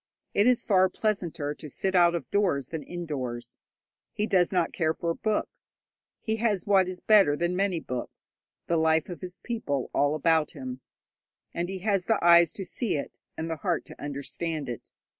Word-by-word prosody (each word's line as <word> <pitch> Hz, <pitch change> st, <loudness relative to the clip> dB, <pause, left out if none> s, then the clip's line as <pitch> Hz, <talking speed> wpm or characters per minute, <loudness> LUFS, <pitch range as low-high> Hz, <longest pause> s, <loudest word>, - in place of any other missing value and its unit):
It 205 Hz, +3 st, +4 dB
is 250 Hz, -1 st, +3 dB
far 190 Hz, -3 st, +4 dB
pleasanter 180 Hz, -9 st, -2 dB
to 150 Hz, -, -10 dB
sit 190 Hz, +6 st, -2 dB
out 175 Hz, -2 st, +5 dB
of 170 Hz, -, -4 dB
doors 180 Hz, -10 st, +1 dB
than 160 Hz, -2 st, -4 dB
indoors. 130 Hz, -8 st, -5 dB, 0.5 s
He 210 Hz, -, 0 dB
does 180 Hz, -5 st, +3 dB
not 180 Hz, -3 st, +1 dB
care 160 Hz, -2 st, 0 dB
for 170 Hz, -1 st, -1 dB
books. 215 Hz, +4 st, -3 dB, 0.5 s
He 220 Hz, 0 st, -1 dB
has 210 Hz, -5 st, 0 dB
what 195 Hz, -2 st, +4 dB
is 185 Hz, -1 st, -5 dB
better 195 Hz, -9 st, +5 dB
than 175 Hz, +2 st, 0 dB
many 190 Hz, -2 st, +1 dB
books 125 Hz, -5 st, -7 dB, 0.3 s
the 170 Hz, -, +1 dB
life 160 Hz, 0 st, +2 dB
of 175 Hz, -, -7 dB
his 180 Hz, -1 st, -8 dB
people 145 Hz, -, -2 dB
all 145 Hz, +1 st, +2 dB
about 160 Hz, 0 st, +2 dB
him, 130 Hz, 0 st, -7 dB, 0.7 s
and 175 Hz, +1 st, -2 dB
he 190 Hz, -, -4 dB
has 195 Hz, -4 st, +1 dB
the 225 Hz, -, +3 dB
eyes 170 Hz, -1 st, +6 dB
to 195 Hz, -, -6 dB
see 225 Hz, 0 st, -1 dB
it 145 Hz, -, -5 dB, 0.2 s
and 160 Hz, -, -3 dB
the 165 Hz, -1 st, -3 dB
heart 175 Hz, 0 st, -1 dB
to -, -, -12 dB
understand 145 Hz, +2 st, -4 dB
it. 120 Hz, -, -6 dB
170 Hz, 185 wpm, -27 LUFS, 150-195 Hz, 0.7 s, eyes